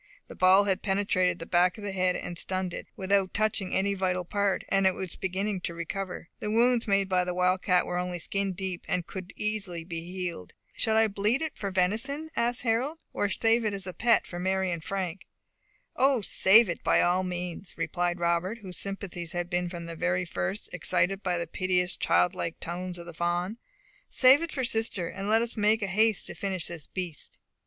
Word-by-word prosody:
The - - -9
ball 185 +2 +6
had 195 -2 0
penetrated 190 -3 +1
the 165 - -7
back 180 +2 +3
of 210 - -8
the 205 - -3
head 185 -1 +1
and 175 - -5
stunned 185 +1 -2
it, - - -6
without 195 0 +1
touching 210 -3 0
any 200 +1 +2
vital 185 -2 -1
part, 200 +1 0
and 195 -1 +3
it 190 - +2
was 185 -2 -4
beginning 190 +1 -2
to 170 - -4
recover; 180 +1 -5
the 210 - -3
wounds 235 +2 +3
made 195 -1 +2
by 185 -1 +2
the 180 0 -3
wildcat 180 0 +2
were 180 - -2
only 180 0 -3
skin 195 +3 -1
deep, 185 -1 -4
and 180 -2 0
could 185 +1 -7
easily 205 -6 -2
be 165 -1 -5
healed. 175 - -5 0.2
"Shall 220 -1 +1
I 225 0 +5
bleed 210 +8 0
it 315 - -3
for 200 - -4
venison?" 225 +12 0
asked 240 +1 +1
Harold, 250 +7 0 0.2
"or 205 - 0
save 230 +2 +2
it 210 -2 0
as 195 -2 -3
a 185 - -5
pet 235 +3 +3
for 175 - -7
Mary 190 0 0
and 170 -2 -4
Frank?" 190 0 -4 0.7
"O, 265 -2 +3
save 205 +3 +6
it 170 - -4
by - - +4
all 180 +1 +3
means," 180 0 -4
replied 175 0 -1
Robert, 170 +5 0
whose 185 -2 -7
sympathies 190 -4 -5
had 175 0 -3
been 175 0 0
from 170 -1 -7
the 180 +2 -1
first 190 +3 -3
excited 180 +2 +1
by 180 -3 0
the 170 - -2
piteous, 180 +1 +1
childlike 180 -2 +1
tones 180 +1 -5
of 170 - -9
the 170 - -9
fawn. 175 +6 -1 0.5
"Save 265 +4 +7
it 335 -1 -3
for 260 - -2
sister, 225 -7 0
and 195 +3 -5
let 225 +2 +4
us 235 - -3
make 215 0 +2
haste 210 +3 +2
to - - -4
finish 190 -4 -3
this 170 -4 -8
beast." 180 -5 -5
185 Hz, 200 wpm, -28 LUFS, 180-205 Hz, 0.7 s, Save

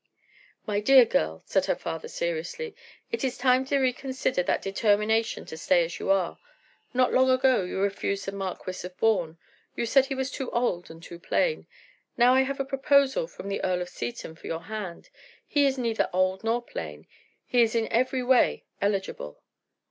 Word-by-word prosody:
"My 205 -1 0
dear 255 +4 +7
girl," 80 - -1
said - - +1
her - - +2
father, 160 -1 -5
seriously, 170 - -4 0.4
"it 460 - -2
is 260 -1 -1
time 255 +1 +3
to 280 +1 +1
reconsider 260 -4 0
that - - 0
determination 210 +3 +1
to 160 - -8
stay 175 +1 +3
as 165 - -7
you - - -4
are. 195 -3 +1 0.5
Not 255 0 +2
long 260 0 +4
ago 255 -2 +4
you 180 - -4
refused 200 0 -1
the 195 - -3
Marquis 190 -2 -5
of 180 0 -9
Bourne. 180 -8 +1 0.4
You - - -1
said 270 +3 +4
he 270 - -3
was 265 -1 -2
too 265 -3 -4
old 235 -8 -1
and 165 +1 -12
too 170 0 -10
plain. 470 - 0 0.5
Now 245 +1 +6
I 260 - +5
have 275 +1 -2
a 275 - 0
proposal 280 - +2
from 200 - -10
the 200 - -3
Earl 180 -1 0
of 175 - -10
Seaton 120 0 -6
for 160 - -12
your 165 0 -4
hand. 210 -5 -7 0.3
He 285 -1 +3
is 270 0 0
neither 230 -3 0
old 185 +2 +1
nor 230 +2 0
plain; 75 - -7 0.4
he 245 - +3
is 230 0 +2
in 225 -1 +1
every 255 +2 +1
way 250 0 +3 0.2
eligible." 195 - -2
225 Hz, 185 wpm, -27 LUFS, 185-260 Hz, 0.5 s, dear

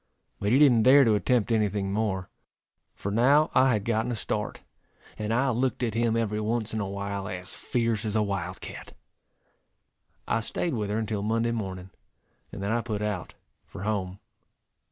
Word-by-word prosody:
But 100 - 0
he 130 - +5
didn't 135 -6 +6
dare 135 +4 +7
to 110 - +4
attempt 115 +2 +1
any 110 -2 +3
thing 100 -1 -2
more, 100 -4 -1 0.7
for 100 - -4
now 140 +8 +4
I 130 -1 +5
had 105 -2 -1
gotten 115 +1 0
a - - -1
start, 105 0 -3 0.5
and 105 0 -3
I 130 +3 +2
looked 125 +2 0
at 115 -3 0
him 115 0 +1
every 110 -2 -1
once 110 0 -1
in 110 - -1
a 100 -2 -2
while 100 0 -4
as 90 -2 -6
fierce 115 -3 -1
as 110 -1 -2
a 110 - +3
wild 95 -3 -3
cat. - - -9 1.3
I - - +1
staid 150 +8 -2
with 105 -4 -2
her 105 - -1
until 110 -2 -2
Monday 115 +2 0
morning, 95 -4 -5 0.6
and 100 - -6
then 100 - -1
I 120 +1 +1
put 110 -3 -3
out 105 -5 -3 0.3
for - - -8
home. 100 -3 -2
110 Hz, 185 wpm, -27 LUFS, 100-115 Hz, 1.3 s, dare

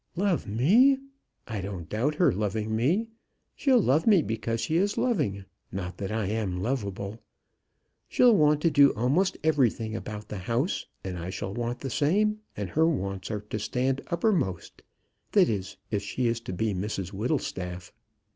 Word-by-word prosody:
"Love 190 -1 0
me! 200 - +5 0.5
I 110 -4 -3
don't 95 -4 -6
doubt 130 +8 0
her 175 +2 +4
loving 105 +2 -1
me. 175 - +1 0.5
She'll 265 -4 +4
love 155 - +2
me 195 -7 +6
because 115 0 -2
she 155 - -1
is 200 +3 +1
loving 100 - 0 0.3
not 90 -1 -5
that 100 0 -3
I 110 -1 -1
am 100 -3 -2
lovable. 100 -2 -3 0.9
She'll 245 -3 +5
want 150 -3 +4
to 165 - +3
do 140 -1 +6
a'most 145 - +1
everything 120 -8 +1
about 105 -2 -6
the 105 - -5
house, 120 - -1 0.2
and 90 -2 -4
I 85 +2 -5
shall 95 +1 -4
want 120 +1 -3
the 135 - -4
same; 210 - +2 0.2
and - - -4
her 160 +1 +3
wants 95 - -2
are 105 -2 -3
to 105 +1 -5
stand 130 +5 -1
uppermost, 170 - -1 0.5
that 195 -4 +6
is, 95 -4 -3
if 105 -2 0
she 100 +6 -2
is 115 0 +1
to 115 - -7
be 105 +3 -1
Mrs 95 0 -3
Whittlestaff." 95 - -3
115 Hz, 165 wpm, -27 LUFS, 100-155 Hz, 0.9 s, me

